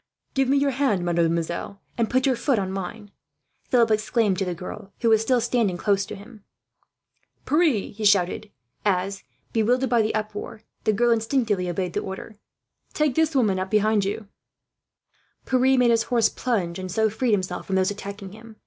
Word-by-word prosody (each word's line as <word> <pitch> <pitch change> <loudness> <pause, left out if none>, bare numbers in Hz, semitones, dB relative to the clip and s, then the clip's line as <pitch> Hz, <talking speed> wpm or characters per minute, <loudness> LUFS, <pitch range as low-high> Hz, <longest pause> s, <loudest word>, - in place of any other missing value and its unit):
"Give 270 -1 +2
me 275 +2 +3
your 280 0 +2
hand, 250 -9 0
mademoiselle, 170 +2 -1 0.2
and 230 -2 0
put 255 +2 +2
your 265 -2 +3
foot 260 +1 +1
on 190 -2 -1
mine," 200 +2 -6 0.6
Philip 235 -3 +4
exclaimed 215 -2 +1
to 195 - 0
the 180 -1 -3
girl, 195 +3 -8
who 230 - +3
was 220 -1 +5
still 245 +2 +2
standing 230 -6 0
close 200 +1 +1
to - - -6
him. 210 +1 -14 1.0
"Pierre," 300 - +2
he 215 +1 -8
shouted 200 0 +2 0.3
as, 195 0 0 0.3
bewildered 245 +4 +1
by 235 -2 +4
the 215 0 -1
uproar, 215 0 -5 0.2
the 215 - +3
girl 240 +3 +2
instinctively 225 -5 +1
obeyed 175 0 -2
the - - 0
order, 200 +2 -7 0.6
"take 300 -3 +2
this 320 +1 +1
woman 210 -8 +2
up 190 0 -3
behind 215 0 +2
you." 205 +2 -3 1.2
Pierre 260 +1 +3
made 245 -2 +4
his 230 -1 +3
horse 235 -3 +3
plunge, 190 -9 -2
and 185 -1 -5
so 220 +3 +2
freed 220 +2 0
himself 185 -3 -2
from 190 - -1
those 190 +1 +2
attacking 200 -1 -7
him. 220 +1 -13
215 Hz, 180 wpm, -24 LUFS, 195-240 Hz, 1.2 s, was